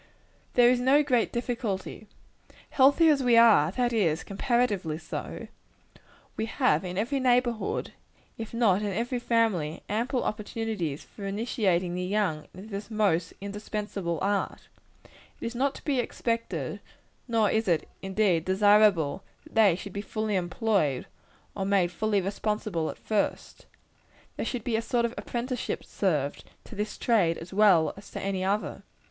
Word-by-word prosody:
There 245 Hz, 0 st, +6 dB
is 250 Hz, -, +2 dB
no 270 Hz, +4 st, +4 dB
great 250 Hz, -5 st, +1 dB
difficulty 235 Hz, -5 st, -3 dB
in -, -, -13 dB, 0.5 s
the -, -, -23 dB
case. -, -, -24 dB
Healthy 285 Hz, +5 st, +5 dB
as 290 Hz, -3 st, +3 dB
we 245 Hz, -2 st, +4 dB
are 215 Hz, -9 st, +6 dB
that 245 Hz, 0 st, 0 dB
is, 165 Hz, -8 st, +1 dB
comparatively 205 Hz, -, 0 dB
so 165 Hz, 0 st, -6 dB, 0.9 s
we 220 Hz, -, -2 dB
have 255 Hz, -4 st, +2 dB
in 180 Hz, 0 st, -5 dB
every 255 Hz, +7 st, 0 dB
neighborhood, 245 Hz, -3 st, +1 dB, 0.4 s
if 225 Hz, -1 st, -7 dB
not 220 Hz, -5 st, +2 dB
in 205 Hz, -1 st, -1 dB
every 240 Hz, +5 st, -1 dB
family, 220 Hz, -11 st, 0 dB
ample 240 Hz, +5 st, -1 dB
opportunities 210 Hz, -8 st, -3 dB
for 200 Hz, -2 st, -8 dB
initiating 195 Hz, -4 st, 0 dB
the 180 Hz, -, -2 dB
young 185 Hz, -5 st, -1 dB
into 190 Hz, +4 st, -10 dB
this 200 Hz, +2 st, -5 dB
most 200 Hz, -7 st, +1 dB
indispensable 200 Hz, -3 st, -4 dB
art. 200 Hz, 0 st, -2 dB, 0.7 s
It -, -, -6 dB
is 230 Hz, -, -3 dB
not 270 Hz, +3 st, -1 dB
expected, 240 Hz, -3 st, -2 dB, 0.5 s
nor 225 Hz, -3 st, +2 dB
is 220 Hz, -1 st, 0 dB
it 170 Hz, -3 st, +1 dB
indeed 190 Hz, -4 st, +1 dB
desirable, 195 Hz, -5 st, +4 dB, 0.2 s
that -, -, -17 dB
they 210 Hz, -6 st, +5 dB
should 195 Hz, +1 st, -8 dB
be 200 Hz, -, -3 dB
fully 215 Hz, 0 st, -2 dB
employed, 180 Hz, -, 0 dB, 0.5 s
or 195 Hz, -, -3 dB
made 190 Hz, -3 st, +2 dB
fully 205 Hz, +2 st, 0 dB
responsible, 195 Hz, -3 st, -2 dB
at -, -, -7 dB
first. 215 Hz, -2 st, -2 dB, 0.7 s
There -, -, -3 dB
should 245 Hz, -4 st, -3 dB
be 235 Hz, -1 st, -1 dB
a 225 Hz, -, +1 dB
sort 235 Hz, +1 st, 0 dB
of 235 Hz, -, -3 dB
apprenticeship 245 Hz, 0 st, -3 dB
served, 150 Hz, -8 st, -1 dB, 0.2 s
to -, -, -12 dB
this 210 Hz, 0 st, -4 dB
trade 190 Hz, -9 st, +2 dB
as 165 Hz, +3 st, -9 dB
well 190 Hz, -6 st, +5 dB
as 200 Hz, -, -13 dB
to -, -, -6 dB
any 195 Hz, -1 st, -2 dB
other. 200 Hz, +3 st, -1 dB
210 Hz, 155 wpm, -27 LUFS, 185-235 Hz, 0.9 s, There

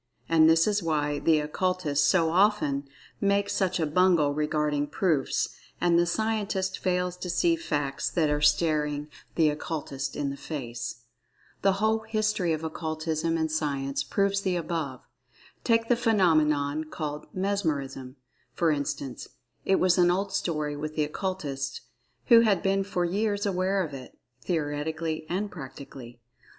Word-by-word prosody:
And 160 Hz, -1 st, +5 dB
this 165 Hz, 0 st, +5 dB
is 210 Hz, -1 st, +1 dB
why 150 Hz, -3 st, 0 dB
the 160 Hz, -2 st, +3 dB
Occultists 150 Hz, -2 st, 0 dB
so 165 Hz, 0 st, +3 dB
often 170 Hz, -8 st, +2 dB, 0.3 s
make 200 Hz, 0 st, +1 dB
such 185 Hz, -2 st, 0 dB
a 160 Hz, -, +2 dB
bungle 160 Hz, -2 st, +3 dB
regarding 150 Hz, -1 st, 0 dB
"proofs" 155 Hz, -2 st, 0 dB, 0.3 s
and 170 Hz, -1 st, +3 dB
the 175 Hz, -, +2 dB
Scientist 205 Hz, -1 st, -1 dB
fails 180 Hz, -1 st, 0 dB
to 180 Hz, -, -6 dB
see 335 Hz, -, +2 dB
"facts" 145 Hz, -, -2 dB
that 165 Hz, -3 st, +1 dB
are 150 Hz, 0 st, 0 dB
staring 150 Hz, -1 st, +2 dB, 0.3 s
the 160 Hz, -2 st, +4 dB
Occultist 140 Hz, -3 st, -4 dB
in 140 Hz, -1 st, -2 dB
the 140 Hz, -, -7 dB
face.[Pg 120 Hz, -7 st, -5 dB, 0.6 s
5] -, -, -39 dB
The 195 Hz, -, +4 dB
whole 220 Hz, +3 st, +1 dB
history 215 Hz, -5 st, 0 dB
of 160 Hz, 0 st, -2 dB
Occultism 160 Hz, 0 st, -2 dB
and 160 Hz, -1 st, -1 dB
Science 140 Hz, -3 st, -1 dB
proves 200 Hz, +7 st, 0 dB
the 185 Hz, -2 st, 0 dB
above. 160 Hz, -6 st, -3 dB, 0.6 s
Take 230 Hz, -1 st, +2 dB
the 245 Hz, -, +4 dB
phenomenon 155 Hz, -9 st, +2 dB
called 150 Hz, -1 st, -5 dB
"Mesmerism" 155 Hz, -10 st, -2 dB, 0.4 s
for 165 Hz, -2 st, +2 dB
instance—it 140 Hz, +1 st, -3 dB
was 185 Hz, 0 st, +3 dB
an 175 Hz, 0 st, +5 dB
old 195 Hz, +2 st, 0 dB
story 150 Hz, -6 st, -1 dB
with 155 Hz, +1 st, -5 dB
the 155 Hz, -, +2 dB
Occultists, 145 Hz, -5 st, -3 dB, 0.4 s
who 230 Hz, -, +8 dB
had 210 Hz, -6 st, +3 dB
been 195 Hz, 0 st, +2 dB
for 180 Hz, -3 st, -1 dB
years 205 Hz, +3 st, 0 dB
aware 190 Hz, 0 st, +1 dB
of 155 Hz, -4 st, -6 dB
it, 130 Hz, -2 st, -10 dB, 0.2 s
theoretically 155 Hz, 0 st, -2 dB
and 200 Hz, +3 st, -2 dB
practically. 135 Hz, -5 st, -10 dB
160 Hz, 145 wpm, -27 LUFS, 145-190 Hz, 0.6 s, who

